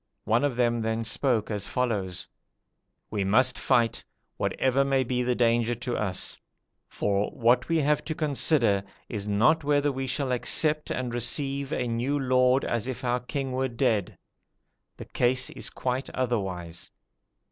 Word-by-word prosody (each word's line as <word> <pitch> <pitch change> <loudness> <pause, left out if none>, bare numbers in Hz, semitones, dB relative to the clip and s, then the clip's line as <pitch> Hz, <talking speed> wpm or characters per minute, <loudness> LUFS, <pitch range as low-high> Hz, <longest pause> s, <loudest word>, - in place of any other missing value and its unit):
One 115 +5 +2
of 145 -4 0
them 120 -1 +1
then 110 +1 -1
spoke 115 -2 0
as 100 -1 -2
follows: 100 -8 -2 0.8
'We 100 -2 -1
must 125 +6 +3
fight, 115 -1 +1 0.3
whatever 130 +1 +1
may 135 -1 +2
be 125 0 -1
the 125 0 0
danger 120 0 +2
to 120 +1 -4
us; 95 -4 -3 0.5
for 100 0 0
what 120 +5 +2
we 165 - +2
have 150 0 +1
to 155 - -3
consider 140 -9 +2 0.3
is 105 -2 -4
not 120 +11 +3
whether 145 0 +2
we 135 0 -4
shall 130 0 -1
accept 150 +5 +2
and 125 -2 -3
receive 135 +3 -1
a 125 - -1
new 120 +5 -1
lord 130 -1 +3
as 115 0 -1
if 130 0 -5
our 125 0 +1
king 135 +2 -4
were 130 +1 0
dead: 115 -5 0 0.8
the - - -8
case 130 +1 +1
is - - -5
quite 130 +1 -3
otherwise. 95 -9 -3
125 Hz, 155 wpm, -27 LUFS, 115-135 Hz, 0.8 s, must